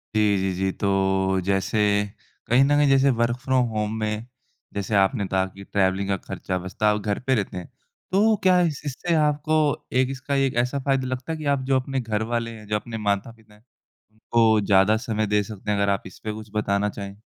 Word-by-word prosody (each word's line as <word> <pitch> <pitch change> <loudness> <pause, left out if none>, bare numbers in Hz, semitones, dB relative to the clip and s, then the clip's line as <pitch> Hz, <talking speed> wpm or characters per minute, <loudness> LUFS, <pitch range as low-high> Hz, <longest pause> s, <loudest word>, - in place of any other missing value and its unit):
जी, 105 -2 +3
जी, 95 -1 0
जी। 95 +1 0
तो 95 -1 +1
जैसे 100 +3 0 0.7
कहीं 125 +4 +5
न 145 +2 +3
कहीं 145 -1 +4
जैसे 135 0 +4
वर्क 120 +1 +1
फ्रॉम 130 -1 +1
होम 105 -1 -2
में 105 +1 -2 0.5
जैसे 100 +1 -2
आपने 100 +2 +2
कहा 95 0 +1
कि 95 +1 -11
ट्रैवलिंग 95 0 0
का 100 - +1
खर्चा 95 +1 -4
बचता 95 +4 0
और 105 - -2
घर 100 0 -2
पे 130 - +4
रहते 100 -4 -2
हैं। 90 - -7 0.4
तो 215 +3 +4
क्या 185 -1 +5
इस 160 -5 -1
इससे 145 +5 -2
आपको 150 +1 +2 0.3
एक 130 +1 +2
इसका, 135 +1 -3
एक 135 -3 +1
ऐसा 125 +3 +1
फ़ायदा 135 -1 0
लगता 130 +4 -4
है 160 - -3
कि 155 - -7
आप 135 - -1
जो 135 -1 +3
अपने 135 +1 -3
घरवाले 115 +1 -2
हैं, 110 -2 -11
जो 105 - -1
अपने 115 +2 -4
माता-पिता 105 +1 -3 0.6
उनको 110 0 +2
ज़्यादा 100 +2 +4
समय 110 -2 0
दे 105 0 +2
सकते 105 0 -5
हैं। 100 - +1
अगर 100 0 +1
आप 100 - 0
इस 95 - -14
पे 110 - -3
कुछ 110 0 -9
बताना 105 -1 +1
चाहें? 100 0 -8
110 Hz, 210 wpm, -24 LUFS, 100-130 Hz, 0.7 s, कहीं